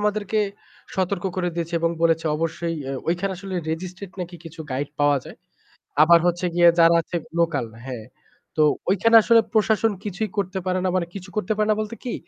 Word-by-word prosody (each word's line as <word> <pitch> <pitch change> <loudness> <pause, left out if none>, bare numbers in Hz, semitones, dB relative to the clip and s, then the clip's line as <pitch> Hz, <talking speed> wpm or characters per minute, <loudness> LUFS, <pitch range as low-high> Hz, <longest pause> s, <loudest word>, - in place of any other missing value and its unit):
আমাদেরকে 210 0 0 0.6
সতর্ক 190 0 -1
করে 180 -1 0
দিয়েছে 170 0 -3
এবং 165 0 +2
বলেছে 165 -1 +2
অবশ্যই 165 +1 -2 0.2
এ - - -3 0.2
ওইখানে 180 +3 0
আসলে 195 +1 -7 0.2
registrate 185 +3 -6
নাকি 175 0 -6
কিছু 165 0 -10
গাইড 135 +2 -2
পাওয়া 145 0 +4
যায়। - - -11 0.7
আবার 170 +2 +7
হচ্ছে 175 +1 0
গিয়ে 175 0 +6
যারা 165 0 +6
আছে 175 - -5 0.2
লোকাল 160 -7 +1 0.2
হ্যাঁ। 120 -4 -7 0.5
তো 155 - +4 0.3
ওইখানে 230 +4 +5
আসলে 230 +1 +5
প্রশাসন 220 0 +2
কিছুই 210 +1 -3
করতে 190 -1 -1
পারে 185 0 +1
না। - - +2
মানে 175 -2 0
কিছু 190 -1 -8
করতে 215 0 0
পারে 215 0 +1
না 210 - +3
বলতে 215 +1 -4
কী? 245 - -3
180 Hz, 185 wpm, -23 LUFS, 165-205 Hz, 0.7 s, আবার